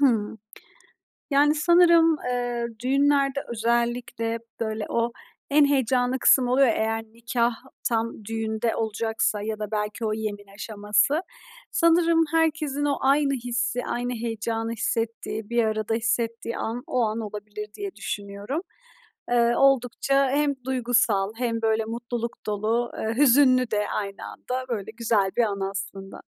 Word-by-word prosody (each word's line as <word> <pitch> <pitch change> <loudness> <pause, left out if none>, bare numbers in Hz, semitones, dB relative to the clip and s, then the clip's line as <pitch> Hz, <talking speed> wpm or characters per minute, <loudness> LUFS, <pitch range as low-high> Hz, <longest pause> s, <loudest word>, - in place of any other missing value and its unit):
Hıı. 225 -6 +2 0.9
Yani, 295 +2 +4
sanırım, 335 0 +5
eee, 245 -1 -1 0.2
düğünlerde 275 +1 +2
özellikle, 235 0 -1 0.2
böyle, 220 -1 -2
o 235 0 0 0.4
en 290 +1 +5
heyecanlı 260 -2 +1
kısım 250 0 +5
oluyor 260 +2 +4
ya 225 - +3
eğer 225 0 -1
nikâh 235 +2 -1 0.4
tam 225 -2 -2
düğünde 225 +1 -2
olacaksa 220 -1 -1
ya 215 0 -4
da 210 -1 -5
belki 210 +2 -2
o 215 - 0
yemin 210 -2 -4
aşaması. 210 +7 +1 0.5
Sanırım 335 -1 +4
herkesin 305 -3 +1
o 285 -1 +1
aynı 275 +1 +3
hissi, 245 0 -2
aynı 245 +1 -2
heyecanı 225 0 -3
hissettiği, 225 -1 -3
bir 235 0 +2
arada 215 0 -1
hissettiği 230 0 -1
an, 235 +2 -3
o 250 - 0
an 220 0 0
olabilir 210 -1 -6
diye 400 -2 -6
düşünüyorum. 205 +9 -4 0.7
Eee, 240 0 +3
oldukça, 275 +1 +3
hem 285 +1 +2
duygusal 235 -6 +1
hem, 230 -2 -1
böyle, 220 0 +1
mutluluk 235 +1 -5
dolu, 220 +3 -1
eee, 220 +1 -2
hüzünlü 255 -2 +5
de 210 -1 0
aynı 200 -1 -4
anda, 255 +1 -5
böyle, 220 -3 -3
güzel 220 -4 +1
bir 240 - +5
anı 200 -3 -1
aslında. 195 0 -7
235 Hz, 135 wpm, -25 LUFS, 220-260 Hz, 0.9 s, sanırım